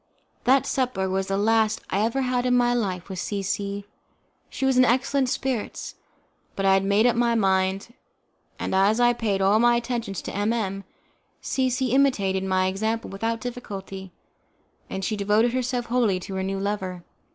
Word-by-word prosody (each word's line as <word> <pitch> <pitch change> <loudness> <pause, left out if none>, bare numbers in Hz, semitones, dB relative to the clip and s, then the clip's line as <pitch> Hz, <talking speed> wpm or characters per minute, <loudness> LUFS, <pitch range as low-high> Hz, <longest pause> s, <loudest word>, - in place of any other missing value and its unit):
That 265 +1 +4
supper 250 -8 -1
was 190 0 -1
the 195 - -1
last 220 +1 +2
I 195 - +1
ever 230 +5 0
had 250 0 0
in 250 - +3
my 245 0 +3
life 190 -7 -2
with 190 -2 -6
C 200 +2 -3
C. 200 +1 -3 0.6
She 270 - -3
was 265 -1 +3
in 255 - +6
excellent 260 +2 +2
spirits, 260 -4 -3 0.6
but 195 - -2
I 195 - +5
had 195 0 +3
made 200 +3 +3
up 245 - +4
my 235 0 +2
mind, 195 +1 +1 0.6
and - - -3
as 200 +4 +3
I 240 0 +5
paid 205 -5 -1
all 200 +3 +4
my 240 +1 +5
attentions 235 -5 -3
to - - -6
M 205 +3 +1
M, 195 -4 -3 0.5
C 260 -1 0
C 255 -1 -1
imitated 205 -9 +2
my 185 -1 +1
example 220 +5 -2
without 225 +3 -2
difficulty, 195 -6 -7 0.8
and 190 0 -4
she 215 - -1
devoted 210 +4 +2
herself 250 -1 -1
wholly 235 -6 +1
to 195 - -7
her 190 - -2
new 195 +1 -2
lover. 195 -3 -3
215 Hz, 180 wpm, -25 LUFS, 195-245 Hz, 0.8 s, in